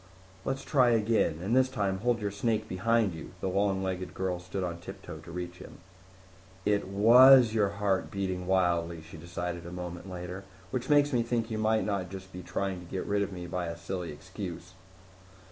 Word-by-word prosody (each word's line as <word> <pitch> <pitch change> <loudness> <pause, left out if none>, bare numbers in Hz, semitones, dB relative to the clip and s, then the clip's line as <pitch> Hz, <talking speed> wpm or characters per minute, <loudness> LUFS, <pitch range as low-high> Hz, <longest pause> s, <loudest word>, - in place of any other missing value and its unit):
"Let's 135 0 -2
try 130 -4 +4
again. 110 -8 +2
And 110 +6 +1
this 130 0 +4
time 100 -7 -1
hold 120 +1 +1
your 100 -1 -1
snake 110 +1 -1
behind 110 +1 +1
you." 80 - -9
The - - -2
long 95 0 +1
legged 95 -1 -3
girl 95 -2 -1
stood 90 +2 -4
on 85 -1 -3
tiptoe 80 -2 -9
to 85 +2 -11
reach 90 +1 -5
him. - - -11 0.9
"It 100 -2 +1
was 120 +4 +8
your 105 -3 +3
heart 100 -1 0
beating 95 -2 -3
wildly," 85 -3 +1
she 80 - -11
decided 85 +1 -5
a - - -7
moment 90 0 -6
later. 90 +1 -6 0.3
"Which 130 +1 -3
makes 145 -1 +4
me 120 - +3
think 115 -1 -1
you 110 - -2
might 110 0 +2
not 100 -4 -2
just 95 0 -9
be 90 - -6
trying 95 +1 -3
to 90 -1 -13
get 95 - -3
rid 100 0 +1
of 100 - -1
me 90 -2 -6
by 90 0 -3
a 85 0 -5
silly 85 0 -4
excuse." 90 +2 -8
95 Hz, 195 wpm, -30 LUFS, 90-110 Hz, 0.9 s, was